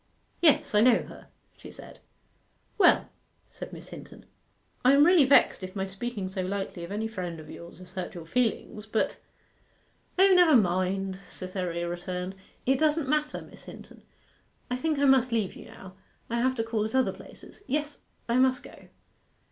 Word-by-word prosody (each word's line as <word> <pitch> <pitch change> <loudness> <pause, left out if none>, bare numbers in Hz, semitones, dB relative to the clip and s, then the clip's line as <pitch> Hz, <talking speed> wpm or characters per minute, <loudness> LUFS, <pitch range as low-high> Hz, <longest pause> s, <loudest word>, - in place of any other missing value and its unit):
'Yes, 310 -9 +3
I 210 - +5
know 245 0 +5
her,' - - -13 0.3
she - - -12
said. - - -13 0.8
'Well,' 360 - +5 0.4
said - - -9
Miss - - -11
Hinton, - - -12 0.6
'I 255 +2 +6
am 285 +1 +6
really 345 -4 +6
vexed 275 -5 +4
if 185 +1 -8
my 190 -1 -1
speaking 195 +1 -5
so 190 0 -4
lightly 190 -1 -4
of 170 - -8
any 215 +2 -2
friend 180 -6 -5
of 155 -1 -11
yours 170 0 -11
has 180 0 -13
hurt 185 -1 -5
your 170 -2 -8
feelings, 220 +1 -2
but 215 +1 -1 0.5
' - - -39
'O, 385 +1 +6
never 350 -5 +6
mind,' 190 -1 +1
Cytherea 180 -2 -4
returned; 180 +1 -4 0.3
'it 265 +1 +2
doesn't 310 -2 +1
matter, 300 0 -1
Miss - - -14
Hinton. - - -12 0.7
I - - +1
think 310 +4 -1
I 285 - +2
must 260 -2 +4
leave 220 -5 -1
you - - -11
now. 190 -1 -12 0.4
I 235 0 0
have 260 +1 +1
to 225 - -1
call 225 -1 -1
at 220 +4 -3
other 260 -1 +2
places. - - -14
Yes 295 +2 -2 0.3
I 235 +1 +1
must 255 0 +3
go. - - -14
220 Hz, 180 wpm, -27 LUFS, 185-265 Hz, 0.8 s, I